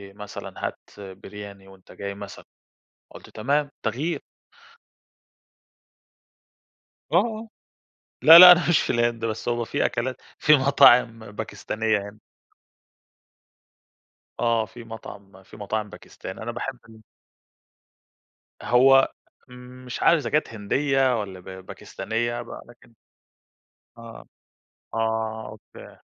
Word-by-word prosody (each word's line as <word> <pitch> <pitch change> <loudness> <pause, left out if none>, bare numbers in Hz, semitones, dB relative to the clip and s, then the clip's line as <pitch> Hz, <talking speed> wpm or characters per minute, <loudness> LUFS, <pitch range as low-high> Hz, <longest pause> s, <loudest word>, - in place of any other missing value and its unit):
مثلًا 105 0 -7
هات - - -8 0.4
Biryani 100 -1 -11
وأنت 95 -1 -18
جاي 100 0 -7
مثلًا، 100 0 -10 0.7
قُلت - - -14
تمام 140 +6 -1
تغيير. 140 +10 -3 2.9
آه، - - +3
آه 225 -1 -3 0.7
لأ، 165 +1 +10
لأ 180 0 +12
أنا 175 0 +1
مش 170 - +4
في - - -4
الهند 120 -1 0
بس 110 0 -4
هو 120 -1 -1
في - - -2
أكلات 130 +2 -3 0.2
في 150 - +5
مطاعم 125 -4 +5
باكستانية 110 +1 -2
هنا. 105 - -15 2.2
آه، 115 -2 +1
في 115 +2 -13
مطعم 100 -4 -12
في 105 - -16
مطاعم 105 +1 -4
باكستاني، 95 - -10
أنا 120 +1 -5
باحب 125 +1 -6
ال 110 0 -16 1.6
هو 135 +2 +4 0.4
م 125 +1 -13
مش 125 - -6
عارف 170 - +5
إذا - - -5
كانت 150 +1 +1
هندية، 130 +3 0
والّا 95 -3 -7
ب - - -22 0.2
باكستانية 120 +4 -4
بقى 120 - -10
لكن 120 -1 -20 1.0
آه، 115 -1 -12 0.7
آه 110 0 -2
أوكي. 110 - -15
115 Hz, 115 wpm, -24 LUFS, 105-130 Hz, 2.9 s, لأ